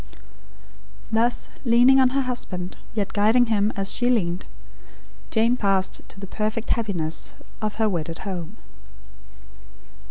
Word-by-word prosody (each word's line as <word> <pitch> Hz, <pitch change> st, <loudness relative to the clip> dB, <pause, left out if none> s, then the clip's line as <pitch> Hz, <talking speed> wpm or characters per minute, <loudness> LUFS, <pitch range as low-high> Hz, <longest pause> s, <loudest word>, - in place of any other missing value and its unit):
Thus, 230 Hz, +2 st, +1 dB
leaning 245 Hz, +2 st, +6 dB
on 260 Hz, -1 st, +5 dB
her 275 Hz, +2 st, +1 dB
husband; 190 Hz, -8 st, -4 dB, 0.2 s
yet 205 Hz, -3 st, -2 dB
guiding 225 Hz, +3 st, +4 dB
him 205 Hz, 0 st, +2 dB
as 195 Hz, 0 st, +1 dB
she 245 Hz, 0 st, +2 dB
leaned; 185 Hz, -7 st, 0 dB, 0.8 s
Jane 230 Hz, +2 st, +3 dB
passed 195 Hz, -4 st, +1 dB
to -, -, -11 dB
the 195 Hz, -, -6 dB
perfect 215 Hz, +3 st, -3 dB
happiness 180 Hz, -9 st, -1 dB, 0.3 s
of 215 Hz, -1 st, -2 dB
her 220 Hz, 0 st, +2 dB
wedded 165 Hz, -4 st, -2 dB
home. 185 Hz, 0 st, -5 dB
215 Hz, 125 wpm, -24 LUFS, 190-235 Hz, 0.8 s, leaning